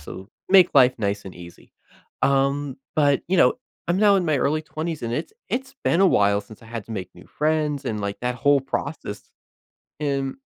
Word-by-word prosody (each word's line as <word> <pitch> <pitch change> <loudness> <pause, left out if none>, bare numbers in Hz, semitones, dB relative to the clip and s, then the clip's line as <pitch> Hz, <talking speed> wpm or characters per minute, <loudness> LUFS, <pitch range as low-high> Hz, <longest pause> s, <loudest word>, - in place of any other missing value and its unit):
so 95 +6 -10 0.2
make 185 -2 +7
life 125 0 +6
nice 100 -1 -2
and 95 - -8
easy. 85 0 -14 0.5
Um, 140 0 +1 0.2
but, 145 -2 +3
you 190 - +2
know, - - +5 0.3
I'm 175 - +2
now 205 -1 +5
in 185 - +1
my 155 -3 +1
early 155 +4 0
20s, 160 0 -5
and 115 0 -3
it's 125 - -3 0.2
it's 265 +2 -3
been 170 - +2
a 195 - +6
while 100 - +3
since 105 +1 -15
I - - -14
had 115 -2 -6
to 115 - -7
make 95 -5 -5
new - - -15
friends, 150 -2 -1
and, 105 -2 -3
like, 100 0 -4
that 125 0 -1
whole 145 +3 +3
process, 135 -5 -5 0.7
and 140 -2 -2
140 Hz, 200 wpm, -23 LUFS, 110-155 Hz, 0.7 s, make